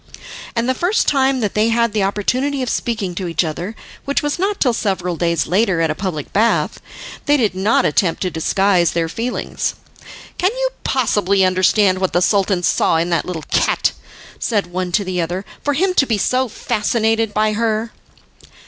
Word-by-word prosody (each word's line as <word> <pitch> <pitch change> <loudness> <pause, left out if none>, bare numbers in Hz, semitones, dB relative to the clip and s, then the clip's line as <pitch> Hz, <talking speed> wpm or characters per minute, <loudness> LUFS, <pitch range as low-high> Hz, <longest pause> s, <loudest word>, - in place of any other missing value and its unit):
And 235 +1 0
the 260 - +2
first 355 - 0
time 270 -2 +2
that 210 -3 -1
they 215 +2 +2
had 235 -1 +1
the 215 - +1
opportunity 255 +8 0
of 250 - -2
speaking 215 -6 -2
to 180 +1 -4
each 165 +1 0
other, 175 +6 -4 0.3
which 280 +1 -1
was 295 +3 -1
not 395 +2 0
till 250 -4 +2
several 190 -5 -1
days 170 -1 0
later 190 0 +1
at 165 -1 +1
a - - 0
public 155 -4 -5
bath, 225 +3 +1 0.5
they 290 0 +4
did 220 -8 +1
not 195 +4 +2
attempt 165 +4 +1
to 185 - -1
disguise 180 +2 +2
their 165 -1 0
feelings. 230 +9 -3 0.6
"Can 365 - +3
you - - 0
possibly 200 -6 +2
understand 185 +1 +3
what 190 -1 -1
the 175 - +3
Sultan 195 -2 +1
saw 165 - +2
in 170 +2 -1
that 170 - +1
little 170 -4 -5
cat," - - +2 0.5
said 210 -4 0
one 180 0 -4
to 205 +3 +2
the 185 -2 -2
other, 180 +4 -3 0.2
"for 290 -1 0
him 370 +5 +1
to 275 -7 +3
be 225 - +1
so 255 +5 +1
fascinated 225 0 0
by 215 0 +1
her?" 225 +1 -1
205 Hz, 185 wpm, -18 LUFS, 180-235 Hz, 0.6 s, they